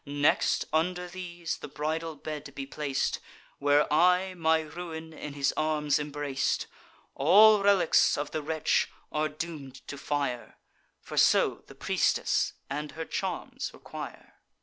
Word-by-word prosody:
Next, 145 +1 +2
under 180 +3 0
these, 175 -2 -5
the - - -8
bridal 155 +3 -3
bed 150 0 -7
be 135 - -4
plac'd, 140 -1 -2 0.4
Where 145 +1 +4
I 180 +3 +4
my 160 -2 +2
ruin 160 0 -7
in 150 -2 -7
his 140 -1 0
arms 150 -2 +1
embrac'd: 145 -2 -1 0.5
All 205 +8 +6
relics 195 -4 +4
of 145 0 -3
the 155 - -2
wretch 155 +1 +1 0.2
are 155 0 0
doom'd 150 -4 -7
to 145 - -7
fire; 140 -4 -3 0.4
For - - -8
so - - +4
the - - -13
priestess - - +1
and 150 +2 -4
her 160 +1 -5
charms - - -4
require." - - -9
155 Hz, 135 wpm, -29 LUFS, 145-170 Hz, 0.5 s, All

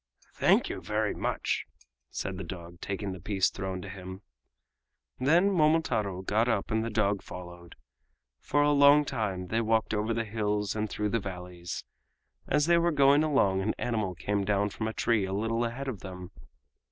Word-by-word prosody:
"Thank - - +3
you - - -5
very 105 +3 -1
much," - - -2 0.4
said 95 -2 -4
the - - -4
dog, 85 -1 -9
taking 100 0 -3
the 95 - -7
piece 95 +1 +1
thrown 95 -1 -4
to - - -7
him. 95 0 -8 1.0
Then 170 +10 +4
Momotaro 150 - +1
got 110 +5 +1
up 110 -3 -1
and 110 0 +1
the 115 - -2
dog 105 -2 +1
followed. 85 -1 -10 0.6
For 145 - +1
a 145 - +4
long 145 +1 +6
time 100 -9 -3
they 115 +3 +1
walked 110 0 +1
over 110 +1 0
the 115 0 -1
hills 105 -1 -1
and 110 0 -1
through 105 +1 -2
the 115 - +1
valleys. 90 -3 -6 0.6
As 150 +1 +2
they 170 +1 +4
were 170 0 +2
going 140 0 +5
along 105 -11 +2
an 110 +3 -1
animal 110 -6 -1
came 100 +3 -1
down 100 +1 +1
from 110 - -3
a 110 - -3
tree 110 -4 +1
a 95 - -4
little 115 +3 0
ahead 125 +4 -4
of 120 -7 -4
them. 90 -1 -8
105 Hz, 180 wpm, -29 LUFS, 95-115 Hz, 1.0 s, long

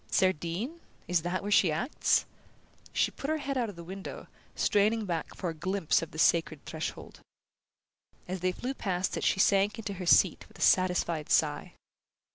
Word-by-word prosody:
"Cerdine? 185 - 0 0.3
Is 175 -1 +2
that 175 +3 -2
where 205 - -3
she 185 -5 +5
acts?" 165 - +1 0.7
She - - +1
put 275 - -6
her 315 - +1
head 280 -2 -3
out 240 -4 0
of 205 - -9
the 170 - -9
window, 190 +3 -8 0.3
straining 215 +2 +2
back 170 -4 -3
for 175 - -3
a - - -7
glimpse 185 +1 0
of 165 - -5
the 160 - -11
sacred 160 -2 +2
threshold. - - -6 1.1
As 185 +1 -4
they 185 +1 +1
flew 250 +8 -4
past 185 -7 -2
it - - -3
she - - +2
sank 200 +3 +3
into 205 -3 -4
her 180 - -4
seat - - +4
with - - -18
a - - -11
satisfied 180 -4 +2
sigh. 150 -2 +1
185 Hz, 180 wpm, -29 LUFS, 170-205 Hz, 1.1 s, she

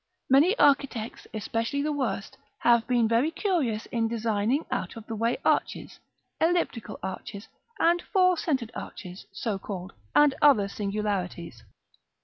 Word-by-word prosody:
Many 320 - +5
architects, 275 -5 +1
especially 230 +6 -2
the 305 - 0
worst, 260 -8 -3 0.3
have 235 -1 +4
been 240 -3 +3
very 230 +7 +2
curious 325 - -1
in 230 -1 +1
designing 225 +4 0
out - - -3
of 225 -2 -9
the 225 - -6
way 230 +2 0
arches, - - 0 0.4
elliptical 325 -8 0
arches, 195 +2 -6 0.3
and 345 +1 +3
four 365 -3 +4
centred 270 -9 -1
arches, 180 0 -8
so 195 +1 -3
called, 190 -1 -7 0.2
and 295 -2 +6
other 250 -9 +5
singularities. 200 - -3
230 Hz, 130 wpm, -27 LUFS, 210-290 Hz, 0.4 s, and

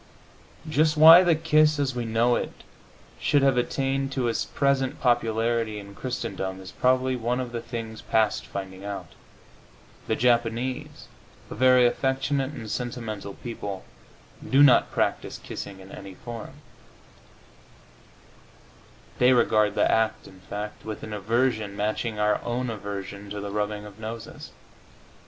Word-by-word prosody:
Just 155 0 +2
why 165 +3 +10
the 175 -3 +4
kiss 155 -1 +3
as 140 -2 0
we 120 -1 -3
know 115 +2 +2
it - - -5 0.6
should 145 -2 +2
have 135 -2 +4
attained 135 +2 -1
to 130 -3 0
its 115 - -1
present 140 -2 0
popularity 115 -2 +1
in 100 -1 -9
Christendom 100 -6 -4
is 95 0 -10
probably 130 0 +2
one 120 +1 -1
of 125 -2 -4
the 120 -1 -4
things 115 -2 -6
past 110 -2 +1
finding 95 -1 -7
out. 100 -4 -6 1.0
The - - +1
Japanese, 120 +1 0 0.4
a - - -3
very 130 -1 +5
affectionate 135 +2 0
and 115 -7 -8
sentimental 110 -4 -5
people, 100 -5 -6 0.6
do 135 +2 +6
not 130 -4 +6
practise - - -1
kissing 95 - -8
in 95 +1 -13
any 95 -1 -10
form; 115 +2 -8 2.7
they 125 +1 +6
regard 110 -3 +3
the - - +3
act, 110 0 +1
in 95 - -15
fact, 105 +3 -7
with 110 -1 -6
an 110 - -6
aversion 110 0 0
matching 110 +2 -2
our 105 0 +1
own 120 0 -2
aversion 100 -1 -6
to 105 0 -5
the 100 0 -5
rubbing 105 0 -2
of 105 0 -12
noses. 110 +1 -7
115 Hz, 140 wpm, -26 LUFS, 105-130 Hz, 2.7 s, why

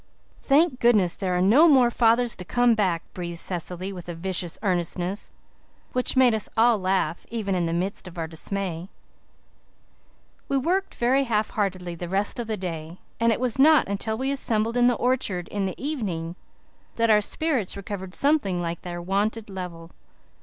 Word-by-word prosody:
"Thank 285 -1 +3
goodness 210 -7 +4
there 185 -2 -1
are 180 - +2
no 260 - +6
more 260 -6 +5
fathers 235 0 +3
to 180 - -6
come 245 +5 +3
back," 185 -6 0
breathed 175 -2 -5
Cecily 180 +2 -3
with 175 -2 -9
a 170 - -4
vicious 175 0 -3
earnestness 180 0 -1 0.6
that 250 +1 0
made 255 -3 +6
us 220 -2 0
all 230 -1 +4
laugh, 185 -2 -1
even 215 -4 -2
in 175 -2 0
the - - -2
midst 185 +3 -3
of 180 -1 -11
our 165 - -2
dismay. 175 +2 -4 1.6
We 275 - +1
worked 365 +8 -1
very 265 +3 +2
half 215 -3 0
heartedly 185 -4 -2
the 170 0 -6
rest 200 +5 0
of 235 - -3
the 220 -1 -2
day, 165 -2 -6 0.2
and 230 0 +3
it 225 - 0
was 250 0 -1
not 305 +2 +6
until 200 +2 -2
we 265 +3 -1
assembled 230 -4 -1
in 245 0 +4
the 245 - +3
orchard 230 -9 -1
in 200 -2 -2
the 185 - -6
evening 190 - -3 0.6
that 230 -1 +3
our 210 -1 +5
spirits 255 - -1
recovered 195 -2 -6
something 275 - +2
like 170 -1 -3
their 175 -1 -6
wonted 205 +3 -1
level. 175 -3 -7
200 Hz, 175 wpm, -25 LUFS, 180-240 Hz, 1.6 s, no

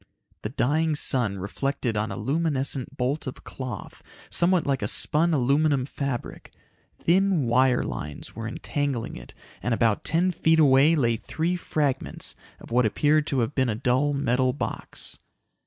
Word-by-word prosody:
The 105 - -3
dying 150 +5 +1
sun 120 -8 +1
reflected 120 +5 -2
on 105 +1 -1
a - - -5
luminescent 140 +1 -1
bolt 135 +4 -1
of 130 - -7
cloth, 130 -2 -7 0.3
somewhat 175 -1 +3
like 135 -3 0
a 105 - -1
spun 160 +9 +2
aluminum 140 0 +2
fabric. 140 -3 -5 0.5
Thin 185 -2 +2
wire 125 +1 +3
lines 75 -1 -6
were 115 0 -5
entangling 135 +1 -3
it, - - -11 0.3
and 120 -1 0
about 110 -3 +1
ten 170 +4 +2
feet 160 -1 +2
away 145 +1 +6
lay 120 -6 +2
three 165 +9 -2
fragments 150 -6 -2 0.2
of - - -13
what 120 -1 +4
appeared 150 +6 +2
to 135 -3 +1
have 115 +5 -1
been 130 -3 +1
a 110 - 0
dull 130 +5 +1
metal 130 -2 +1
box. - - -5
135 Hz, 155 wpm, -25 LUFS, 120-155 Hz, 0.5 s, away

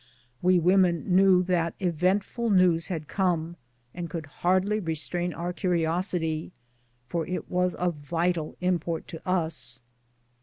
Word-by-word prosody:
We 185 0 +4
women 180 0 +3
knew 190 -1 +6
that 170 -2 0
eventful 190 +6 0
news 180 -4 +4
had 165 -6 -4
come, 175 -4 0 0.4
and 175 -1 -5
could 165 -1 -5 0.2
hardly 190 +4 +2
restrain 175 0 -2
our 175 +1 -4
curiosity^ 170 -2 0 0.6
for 165 +2 -2
it 180 - -4
was 180 0 +1
of 180 -1 0
vital 165 +2 -1
import 175 -2 -1
to 165 - -9
us. 160 -9 -1
175 Hz, 125 wpm, -27 LUFS, 165-185 Hz, 0.6 s, knew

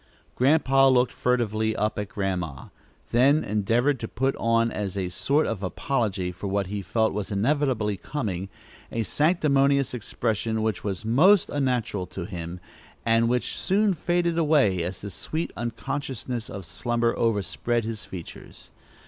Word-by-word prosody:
Grandpa 135 0 +4
looked 125 -2 +4
furtively 110 -3 0
up 105 0 -1
at 105 -1 -4
Grandma, 90 - -3 0.4
then 140 +6 +4
endeavored 115 +7 +1
to 115 - -4
put 135 +5 -1
on 115 0 +2
as 100 -2 -3
a 95 -2 -1
sort 140 - +1
of 110 -4 -3
apology 100 -2 -1
for 90 +3 -6
what 100 0 0
he 100 +2 -4
felt 110 +3 +1
was 105 -1 -3
inevitably 110 -1 +1
coming, 100 -7 -4 0.4
a 115 - -1
sanctimonious 140 - +2
expression 110 -1 -2
which 110 -4 -1
was 100 0 -3
most 170 - +5
unnatural 125 -9 -1
to 90 - -6
him, 85 -2 -6 0.5
and 115 0 +3
which 125 0 0
soon 200 +1 +2
faded 170 0 0
away 145 - +3
as 90 +2 -4
the 100 - -6
sweet 160 - -4
unconsciousness 125 0 -4
of 95 -2 -7
slumber 115 +8 0
overspread 115 +2 0
his 110 -3 -4
features. 95 -2 -10
115 Hz, 145 wpm, -26 LUFS, 100-135 Hz, 0.5 s, most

